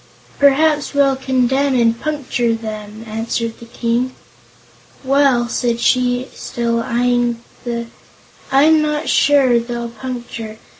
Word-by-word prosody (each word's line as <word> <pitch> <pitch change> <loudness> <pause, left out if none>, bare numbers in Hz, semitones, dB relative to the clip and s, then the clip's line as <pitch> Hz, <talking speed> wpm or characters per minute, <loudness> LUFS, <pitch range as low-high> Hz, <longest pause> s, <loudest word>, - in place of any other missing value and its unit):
"Perhaps 290 +1 +3
we'll 275 -1 +3
condemn 265 +1 +1
'em - - +3
and 230 0 +2
puncture 250 -6 -1
'em," 215 0 -7
answered 225 +1 -3
the 235 - -12
King. 240 +2 -1 0.9
"Well," 265 -3 +3
said 235 0 -1
she, 250 +1 +1
still 235 -1 -2
eyeing 240 0 0 0.2
the 235 -1 -3 0.7
"I'm 305 +3 +5
not 300 0 -1
sure 270 -4 +4
they'll 235 0 -5
puncture. 235 -3 -7
245 Hz, 115 wpm, -18 LUFS, 235-270 Hz, 0.9 s, I'm